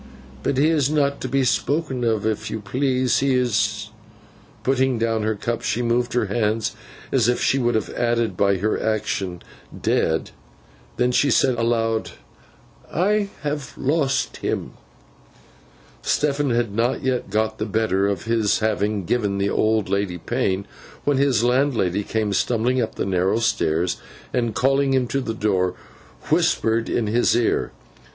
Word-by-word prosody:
But 130 - -1
he 150 +4 +4
is 150 -4 +2
not 140 -2 +1
to - - -2
be 135 +1 +1
spoken 130 +4 0
of 110 -3 +1
if 110 0 -1
you 110 - -3
please. 130 +4 +1
He 135 -1 +2
is—' 125 -3 0 0.7
Putting 130 -1 +2
down 115 -1 0
her 110 0 0
cup, 115 +3 -3
she 120 - -1
moved 120 +1 0
her 120 -2 +2
hands 110 +1 -1 0.4
as - - +3
if 125 - +1
she 135 - +2
would 120 -2 +1
have 110 - -1
added, 120 -1 0
by 100 -1 +2
her 105 +4 -1
action, 100 -5 -2 0.4
'dead!' - - 0 0.7
Then 125 0 +2
she 140 +3 +3
said 130 - +3
aloud, 115 -1 0 0.8
'I 205 +4 +1
have 145 -3 -3
lost 140 -1 0
him.' - - -3 1.3
Stephen 145 -1 +1
had 120 -3 0
not 115 +4 0
yet 130 -5 -1
got 110 +2 -1
the 110 - -2
better 100 -2 +1
of 100 -3 -2
his 110 -2 +1
having 105 -2 0
given 105 -2 0
the 100 0 0
old 110 -1 +1
lady 100 -2 -1
pain, 95 +3 -1 0.4
when 145 -2 +2
his 135 -5 +2
landlady 120 -7 +2
came 105 -1 -1
stumbling 120 +4 +1
up 110 -1 -3
the - - -2
narrow 95 +2 +1
stairs, 85 -7 0 0.4
and 120 -3 0
calling 135 +1 +2
him 130 -1 +2
to 135 - 0
the 115 -3 -4
door, 95 -4 0 0.6
whispered 115 +1 +2
in 120 - 0
his 115 +3 +2
ear. 120 -1 +1
115 Hz, 155 wpm, -22 LUFS, 105-130 Hz, 1.3 s, he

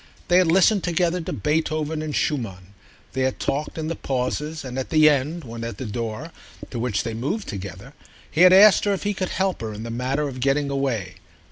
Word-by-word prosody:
They 180 +1 +6
had 175 -3 +3
listened 195 +1 +4
together 175 +1 +1
to - - -5
Beethoven 155 0 -1
and 155 -1 -4
Schumann; 100 - -2 0.4
they 130 - -1
had 130 0 0
talked 145 +4 -2
in 155 -1 -3
the 165 - -2
pauses, 145 +4 -3
and 130 0 -4
at 130 - -4
the 155 -1 +5
end, 150 +3 +1
when 115 -1 -7
at 115 0 -5
the 130 - -5
door, 115 +7 -4 0.4
to 120 - -4
which 115 -4 -1
they 115 - -4
moved 145 - -3
together, 100 +4 -7 0.4
he 160 - +1
had 180 0 +9
asked 200 +3 +7
her 205 - +2
if 195 - -3
he 205 0 0
could 185 -2 -3
help 190 -1 -1
her 110 -1 -4
in 105 - -7
the 115 - -5
matter 130 +5 -1
of 130 -2 -7
getting 140 +2 +1
away. 120 -10 -2
140 Hz, 220 wpm, -23 LUFS, 120-165 Hz, 0.4 s, had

